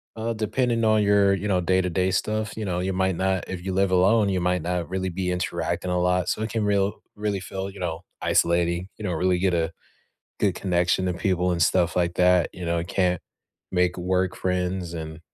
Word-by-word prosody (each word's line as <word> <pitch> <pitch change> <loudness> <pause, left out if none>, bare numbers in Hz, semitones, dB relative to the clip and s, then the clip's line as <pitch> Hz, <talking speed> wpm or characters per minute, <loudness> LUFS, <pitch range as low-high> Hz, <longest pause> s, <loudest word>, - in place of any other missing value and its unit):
uh, 115 +1 -2
depending 115 +2 0
on 110 -1 +4
your, 100 -1 +4
you 100 +2 -2
know, 95 -2 +2
day-to-day 95 +1 +1
stuff, 110 +2 -1
you 110 - -3
know, 90 -2 -1
you 95 +1 -1
might 95 0 +1
not 95 -1 0
if 90 -2 -5
you 95 - -2
live 95 0 +2
alone, 100 +3 +4
you 95 -1 0
might 90 0 +1
not 90 0 -2
really 95 0 -2
be 90 +1 -2
interacting 90 0 -2
a 90 - +1
lot, 90 -1 +1
so - - -1
it 110 - -2
can 110 0 -1
real 100 0 +1 0.2
really 105 -1 -1
feel, 95 +1 -5
you 100 0 -12
know, 85 -3 -3 0.2
isolating, 85 +1 +1
you 110 - -9
know, 90 - -1
really 90 +2 +1
get 95 0 +1
a 80 -1 0 0.7
good - - +1
connection 90 0 +1
to 90 - 0
people 90 0 0
and 85 -1 -1
stuff 85 +1 +2
like 85 -1 +1
that, 90 -1 +4
you 90 - -7
know, 85 0 0
it 85 - -4
can't 90 -2 +1 0.5
make 90 -1 +1
work 90 +1 0
friends, 90 -1 -2
and 80 -1 -6
90 Hz, 215 wpm, -25 LUFS, 90-95 Hz, 0.7 s, on